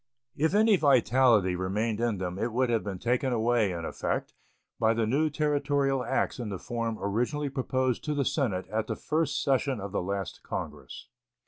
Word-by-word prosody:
If 160 +6 +1
any 215 -1 +5
vitality 125 - +4
remained 105 +5 -1
in 115 -3 0
them 90 0 -4
it 115 +2 -1
would 125 +1 +1
have 115 -2 +1
been 100 -2 -4
taken 125 +6 0
away, 115 -3 +2
in 85 -2 -4
effect, - - -3 0.5
by 110 0 +3
the 115 -1 +1
new 145 +8 +2
Territorial 145 -3 +1
acts 120 - -1
in 115 -3 -4
the 100 - -4
form 115 +1 -3
originally 125 +9 -1
proposed 130 -2 -1
to 150 -1 -1
the 140 -2 0
Senate 130 - -1
at 110 0 -1
the - - -2
first 155 -1 -1
session 135 -2 +1
of 100 0 -6
the 100 - -1
last 100 +1 -4
Congress. 75 -4 -7
120 Hz, 185 wpm, -28 LUFS, 100-140 Hz, 0.5 s, any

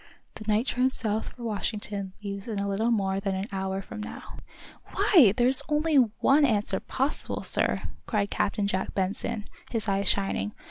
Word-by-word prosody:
"The 215 0 -4
night 215 +4 +2
train 255 0 +2
south 220 -4 -1
for 245 - -12
Washington 205 -3 -3
leaves 200 0 -5
in 220 -3 -3
a 200 0 -1
little 205 +4 0
more 195 -4 +1
than 195 -1 -2
an 190 +2 -3
hour 190 0 -3
from 210 - -8
now." 210 - -9 0.6
"Why, 280 - +6
there's 255 +2 +6
only 300 0 +2
one 265 +4 +4
answer 215 -6 +1
possible, 270 +3 -2
sir," - - +2 0.2
cried 205 -3 0
Captain 205 0 0
Jack 190 -1 -2
Benson, 205 +3 -2 0.2
his 225 -2 -3
eyes 195 -1 +2
shining. 195 - 0
210 Hz, 170 wpm, -27 LUFS, 195-235 Hz, 0.6 s, Why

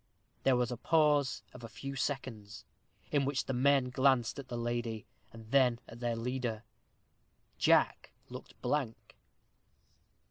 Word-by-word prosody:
There 135 - +3
was 125 -1 0
a 120 - -3
pause 150 -1 +2
of 125 - -11
a 115 - -7
few 135 +5 -7
seconds, 120 -6 -4 0.5
in 145 -2 +2
which 135 0 -1
the 135 - -2
men 130 0 +3
glanced 130 -1 +2
at 135 - -8
the 120 - -5
lady, 120 -2 -3 0.3
and 115 0 -13
then 130 -4 +4
at 115 - -11
their 120 -1 -1
leader. 120 -1 -3 1.0
Jack - - +3 0.2
looked - - -11
blank. 135 -6 -2
125 Hz, 140 wpm, -32 LUFS, 115-135 Hz, 1.0 s, then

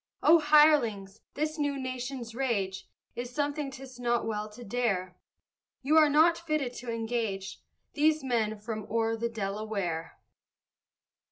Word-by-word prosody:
O 330 +2 +7
hirelings, 295 -11 +4 0.2
this 310 +2 -2
new 285 -1 0
nation's 255 -2 -5
rage 210 -7 -2 0.3
Is 240 0 -4
something 290 +2 -2
'tis 265 -1 -11
not 240 -1 0
well 215 -1 -3
to 240 +3 -11
dare; 195 -6 -1 0.7
You 295 +4 +2
are 305 -2 +7
not 325 +3 +4
fitted 305 -7 -2
to 240 -1 -5
engage 225 -4 -3 0.3
These 310 0 +2
men 225 -4 0
from 215 0 -6
o'er 225 0 +1
the 235 +1 -2
Delaware! 200 -6 -3
240 Hz, 135 wpm, -29 LUFS, 215-285 Hz, 0.7 s, O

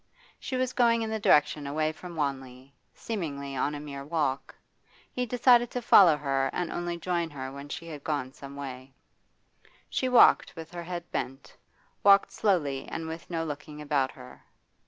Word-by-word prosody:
She 260 - -4
was 255 0 -1
going 230 -2 +3
in 220 - -3
the 220 - -2
direction 150 -5 +3
away 155 +2 0
from 175 +2 -10
Wanley, 135 -3 -4 0.2
seemingly 140 -10 -5
on 145 +3 -1
a - - -5
mere 140 -2 -7
walk. 145 -3 -2 0.6
He 250 0 -2
decided 245 0 +4
to 250 - -4
follow 175 -9 +7
her 135 -2 0
and 180 -2 -2
only 175 0 -3
join 170 -1 -1
her 135 -3 -6
when 140 +1 -9
she 170 +2 -6
had 150 -3 -8
gone 140 -4 -2
some 140 0 -10
way. 135 -1 -8 1.0
She 260 - 0
walked 250 -7 +5
with 160 -1 -9
her 175 -1 -6
head 175 -1 -6
bent, 135 +1 -5 0.5
walked 200 0 +6
slowly 145 -10 0
and 165 0 -5
with 160 +1 -7
no 165 -2 -2
looking 150 0 -7
about 145 -3 0
her. 125 -1 -14
155 Hz, 175 wpm, -28 LUFS, 140-180 Hz, 1.0 s, follow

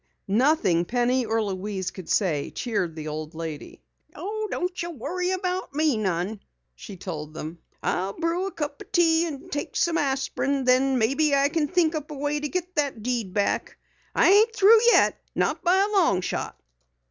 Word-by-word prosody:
Nothing 205 - +3
Penny 245 +4 +1
or 225 0 +1
Louise 195 -1 -3
could 185 -3 -10
say 160 -9 +1
cheered 190 -9 -2
the 155 -1 -6
old 155 +1 -5
lady. 160 -2 -7 0.3
"Don't 405 -3 -3
you 345 - -3
worry 345 +5 -3
none 375 - 0
about 365 -5 -3
me," 215 - 0 0.3
she 125 - -10
told 155 -4 -6
them. 160 +2 -7 0.2
"I'll 190 +2 -1
brew 335 - -1
a - - -5
cup 290 -4 -5
o' - - -29
tea 335 -1 +3
and 315 +3 -8
take 290 - -4
some 335 -1 +2
aspirin. 275 0 -1
Then 255 +1 +3
maybe 280 +6 +2
I 280 +1 +3
kin 310 -1 0
think 340 -1 +2
up 305 -2 -4
a 300 - -6
way 290 +1 -1
to 295 0 -3
git 365 +1 -3
that 280 -7 -1
deed 235 -5 -2
back. 200 -1 0 0.4
I - - +5
ain't 440 +3 +5
through 435 +2 +7
yet - - +4 0.2
not - - 0
by 360 +1 +4
a 410 +2 +1
long 200 - +3
shot!" - - -4
275 Hz, 180 wpm, -25 LUFS, -, 0.4 s, through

